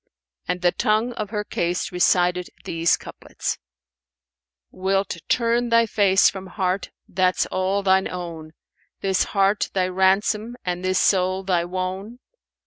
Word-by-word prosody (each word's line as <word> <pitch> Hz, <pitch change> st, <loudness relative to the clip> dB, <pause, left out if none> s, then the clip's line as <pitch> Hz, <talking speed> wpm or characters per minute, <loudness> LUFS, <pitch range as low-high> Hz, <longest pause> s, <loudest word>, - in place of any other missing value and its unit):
And 180 Hz, +1 st, -2 dB
the 175 Hz, -, +4 dB
tongue 220 Hz, +6 st, +1 dB
of 215 Hz, -3 st, -4 dB
her 210 Hz, -1 st, -2 dB
case 175 Hz, -2 st, -2 dB
recited 180 Hz, 0 st, +2 dB, 0.2 s
these 165 Hz, 0 st, +2 dB
couplets, -, -, -6 dB, 1.1 s
"Wilt 195 Hz, 0 st, -1 dB
turn 235 Hz, 0 st, +2 dB
thy 230 Hz, 0 st, +5 dB
face 200 Hz, -3 st, +4 dB
from 190 Hz, -1 st, -3 dB
heart 190 Hz, -1 st, -2 dB, 0.2 s
that's 185 Hz, 0 st, +1 dB
all 190 Hz, +2 st, 0 dB
thine 190 Hz, 0 st, +3 dB
own, 165 Hz, -3 st, -7 dB, 0.2 s
* -, -, -42 dB
This 190 Hz, -1 st, +1 dB
heart 200 Hz, 0 st, +1 dB
thy 185 Hz, -1 st, +2 dB
ransom 200 Hz, +5 st, +1 dB
and 180 Hz, 0 st, -2 dB
this 185 Hz, 0 st, +1 dB
soul 185 Hz, 0 st, +2 dB
thy 180 Hz, -3 st, +1 dB
wone? 185 Hz, +5 st, -4 dB
190 Hz, 135 wpm, -23 LUFS, 180-205 Hz, 1.1 s, thy